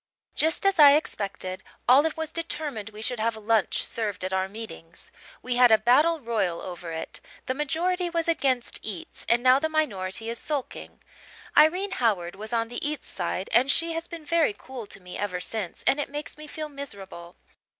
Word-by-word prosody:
"Just 320 +4 +1
as 390 -3 +3
I 285 -2 +10
expected, 195 -9 -2 0.3
Olive 290 +6 +5
was 320 -1 -3
determined 300 -10 -4
we 215 0 -9
should 245 0 -1
have 225 +1 0
lunch 220 -1 +1
served 205 -5 -2
at 190 - -3
our 190 0 +1
meetings. 195 -6 -10 0.3
We 250 -1 -1
had 245 -2 +7
a 220 - +8
battle 295 +9 +4
royal 215 - -1
over 175 -2 -7
it. 160 0 -5 0.3
The 260 - 0
majority 345 +6 0
was 335 -1 -1
against 265 -7 +1
eats 195 -6 -6
and 240 +1 +4
now 255 +1 +6
the 315 +2 0
minority 225 -9 -1
is 235 - -4
sulking. 290 -4 -5 0.5
Irene 360 +6 +5
Howard 200 - 0
was 215 +2 -8
on 230 -1 0
the 240 - -5
eats 300 -3 -5
side 185 +1 -3
and 255 +3 +5
she 330 +4 +2
has 330 +1 -4
been 335 -3 -9
very 320 -8 +2
cool 255 -5 -8
to - - -11
me 180 -1 -9
ever 190 -3 -2
since 195 -1 -5
and 275 - +3
it 290 - -2
makes 295 +1 -5
me 305 0 -10
feel 310 +1 -5
miserable. 200 -12 -8
245 Hz, 190 wpm, -26 LUFS, 205-305 Hz, 0.5 s, I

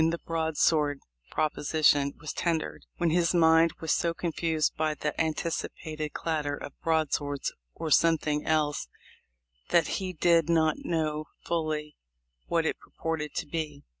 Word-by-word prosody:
259 165 +1 +2
the - - -34
"broadsword 160 -3 +1 0.3
proposition" 150 -2 +2
was 155 0 -5
tendered, 165 -2 -2
when 170 -2 +1
his 175 +1 +2
mind 165 0 +5
was 160 - -1
so 170 -1 +1
confused 165 -2 0
by 155 -1 0
the 150 0 -2
anticipated 155 -1 -3
clatter 150 -3 -1
of 140 - -8
broadswords, 150 -3 0 0.2
or 160 -2 -4
something 150 -1 +3
else, 150 - +1 0.8
that 170 - +4
he 185 -1 -2
did 170 -1 +3
"not 160 -2 +3
know 155 -2 -1 0.2
fully 155 -3 -2 0.5
what - - +1
it - - -1
purported 160 -2 -4
to - - -2
be." 150 -2 -4
160 Hz, 135 wpm, -28 LUFS, 150-165 Hz, 0.8 s, mind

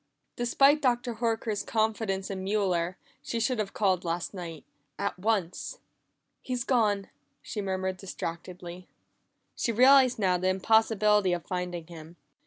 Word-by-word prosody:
Despite 275 +5 +4
Dr. 245 -3 0
Horker's 225 -2 -1
confidence 215 -3 -1
in 190 -1 -4
Mueller, 185 -3 0 0.2
she 235 - -3
should 245 0 0
have 200 -2 -3
called 190 -4 +2
last 170 +2 -3
night 170 -5 -7 0.3
at - - -3
once. 195 -4 -1 0.6
"He's 250 -2 -3
gone!" 210 -7 +1 0.3
she 210 - -4
murmured 190 -1 -2
distractedly. 180 -1 -7 0.7
She 235 - 0
realized 255 +2 +6
now 185 -4 +2
the 185 - 0
impossibility 210 0 +3
of 175 - -3
finding 180 -2 -4
him. 165 0 -11
195 Hz, 130 wpm, -28 LUFS, 180-225 Hz, 0.7 s, realized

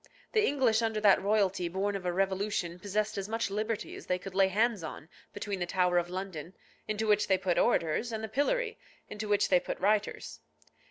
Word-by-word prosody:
The 435 -2 +3
English 255 - +2
under 220 -1 0
that 205 -2 +5
royalty 195 -3 +1
born 195 +3 -1
of 185 -2 -4
a - - +1
revolution 190 -1 -1
possessed 210 +1 -1
as 195 +1 -5
much 225 -2 -1
liberty 215 +2 -3
as - - -11
they 180 - +1
could 185 +1 -9
lay 195 0 +4
hands 215 +1 +1
on 160 0 -8 0.2
between 205 -1 -4
the 175 - -2
Tower 180 -1 +2
of 175 0 -4
London, 185 -2 -6 0.3
into 215 +1 -1
which 210 -1 +3
they 190 - +3
put 185 -2 0
orators, 165 +9 +1
and 220 -1 -4
the - - -2
pillory, 445 - 0 0.3
into 210 0 -5
which 205 0 +2
they 180 - +5
put - - -5
writers. 210 +2 0
200 Hz, 205 wpm, -30 LUFS, 185-215 Hz, 0.3 s, that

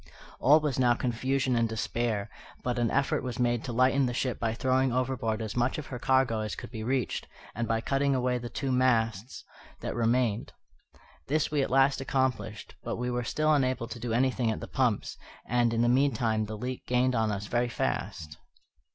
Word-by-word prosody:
All 150 +4 +6
was 150 -4 -1
now 120 -2 +4
confusion 130 +2 0
and 115 -1 +2
despair, 110 -1 -1 0.4
but 125 -1 -1
an 120 -1 +2
effort 140 +1 +1
was 125 -3 -5
made 120 -1 +1
to 125 - -4
lighten 130 +3 +3
the 120 - -3
ship 125 -1 -1
by 115 -1 -1
throwing 130 +1 +2
overboard 120 -3 -1
as 110 0 -5
much 120 +1 +1
of 155 - -5
her 125 - -4
cargo 130 -3 +2
as 110 0 -3
could - - -9
be 110 -3 -5
reached, 125 0 -1 0.3
and 115 0 -2
by 115 0 0
cutting 135 +3 +1
away 125 -1 0
the 120 0 -6
two 135 +1 -3
masts 115 -3 +1 0.4
that - - -3
remained. 115 -1 0 0.7
This 155 +2 +1
we 150 -2 +2
at 135 - -1
last 135 +1 +3
accomplished, 130 -5 -2
but - - -3
we 125 +1 -2
were 125 0 -1
still 155 +5 +1
unable 130 -4 +1
to 120 - -7
do 120 0 -4
anything 125 0 +1
at 110 - -2
the - - -7
pumps; 125 -6 0 0.3
and, 120 -1 +2
in 115 0 +1
the - - +3
meantime, 120 -4 +2
the 110 +1 -6
leak 125 +3 -5
gained 125 +1 +2
on 110 -2 +1
us 100 0 -3
very 120 +3 0
fast. 75 -9 -3
125 Hz, 200 wpm, -29 LUFS, 115-130 Hz, 0.7 s, All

